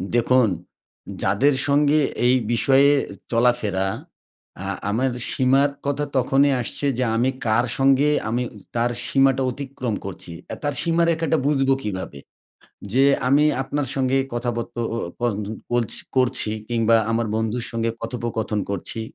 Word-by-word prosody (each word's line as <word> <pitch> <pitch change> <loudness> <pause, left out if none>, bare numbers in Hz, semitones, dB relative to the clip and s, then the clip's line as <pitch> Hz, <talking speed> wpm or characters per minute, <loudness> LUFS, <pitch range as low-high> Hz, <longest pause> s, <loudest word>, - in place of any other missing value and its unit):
দেখুন, 120 -1 +3 0.7
যাদের 125 +10 +3
সঙ্গে 145 +1 +3 0.3
এই 125 +1 +5 0.2
বিষয়ে 135 +4 +4 0.4
চলাফেরা। 115 -5 +1 0.8
আ - - -4 0.2
আমার 125 +5 0 0.2
সীমার 135 +2 +3 0.2
কথা 145 +1 -1
তখনই 135 +2 +3
আসছে 120 - -3
যে 130 - +1
আমি 120 +3 +2 0.2
কার 115 +2 +2
সঙ্গে 135 +2 +4
উ - - -9
আমি 120 +2 0 0.3
তার 120 +1 +1 0.2
সীমাটা 135 -1 +3
অতিক্রম 130 -3 -5
করছি। 95 -3 -6 0.2
অ্যা - - -5
তার 145 0 0
সীমারেখাটা 165 -1 +2
বুঝবো 135 -2 +2
কীভাবে? 95 -8 -5 0.7
যে 135 +3 +4 0.2
আমি 145 +3 +4 0.2
আপনার 145 +1 -2
সঙ্গে 135 0 +1 0.2
কথা 120 +1 -1
বত্ত 120 0 -5 0.2
ও - - -2 0.2
পন্দ 105 -4 -1 0.3
বলছ 120 -3 0 0.2
করছি 125 -4 +2 0.2
কিংবা 115 -1 +3
আমার 115 0 0
বন্ধুর 110 +2 -2
সঙ্গে 115 0 -1
কথোপকথন 115 -2 -3
করছি। 100 +3 -3
125 Hz, 135 wpm, -22 LUFS, 115-135 Hz, 0.8 s, এই